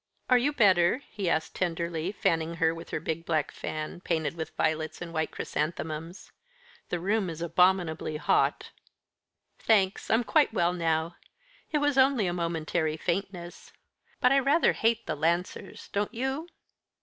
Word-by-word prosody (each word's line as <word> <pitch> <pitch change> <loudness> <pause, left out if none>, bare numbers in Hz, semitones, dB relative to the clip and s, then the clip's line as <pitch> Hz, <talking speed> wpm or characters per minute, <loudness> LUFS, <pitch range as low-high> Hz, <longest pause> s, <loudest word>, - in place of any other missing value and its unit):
"Are 250 - +8
you 275 +4 +1
better?" 200 -1 +3
he 195 -4 -2
asked 160 -1 0
tenderly, 170 -1 -2
fanning 165 -4 0
her 165 0 +2
with 165 0 -9
her - - -2
big 160 +1 -3
black 155 -4 0
fan, 155 +2 -5
painted 160 -4 -1
with 160 -1 -5
violets 155 0 -1
and 170 -1 -7
white 160 -1 0
chrysanthemums. 160 +2 -4 0.6
"The 175 - -1
room 200 +1 0
is 165 -1 -6
abominably 170 -2 +1
hot." - - +1 0.9
"Thanks. 195 -4 +2
I'm 225 +2 +3
quite 285 +1 +2
well 175 -1 +2
now. 165 -1 -1 0.5
It 305 - +2
was 290 -2 +2
only 265 -5 +4
a 175 - 0
momentary 165 -2 -1
faintness. 175 0 -4 0.5
But 250 - +4
I 275 - +5
rather 280 +5 +3
hate 230 0 +1
the - - -2
Lancers, 170 +4 -2
don't 205 +1 -1
you?" 265 +7 -2
175 Hz, 150 wpm, -28 LUFS, 160-210 Hz, 0.9 s, Are